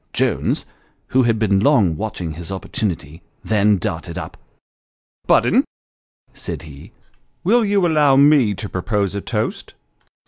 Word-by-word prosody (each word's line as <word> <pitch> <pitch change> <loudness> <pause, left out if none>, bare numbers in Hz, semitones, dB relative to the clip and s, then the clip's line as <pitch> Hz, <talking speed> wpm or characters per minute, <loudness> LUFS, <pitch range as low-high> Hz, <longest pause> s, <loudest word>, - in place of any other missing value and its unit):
Jones, - - 0 0.4
who 130 - +3
had 115 -3 +2
been 100 -3 +2
long 105 - +3
watching 90 -3 -4
his 85 +4 -8
opportunity, 90 -5 -4 0.2
then 105 -1 +2
darted 85 -4 -4
up. - - -6 0.5
" - - -47
Budden," - - +4 0.7
said 70 - -6
he, 75 -3 -12 0.3
" - - -45
will 230 +6 +3
you 205 -1 +2
allovr 150 -6 +3
me 140 -8 +5
to 105 - -6
propose 100 +1 -2
a 100 - -3
toast - - -4
105 Hz, 140 wpm, -20 LUFS, 90-135 Hz, 0.7 s, me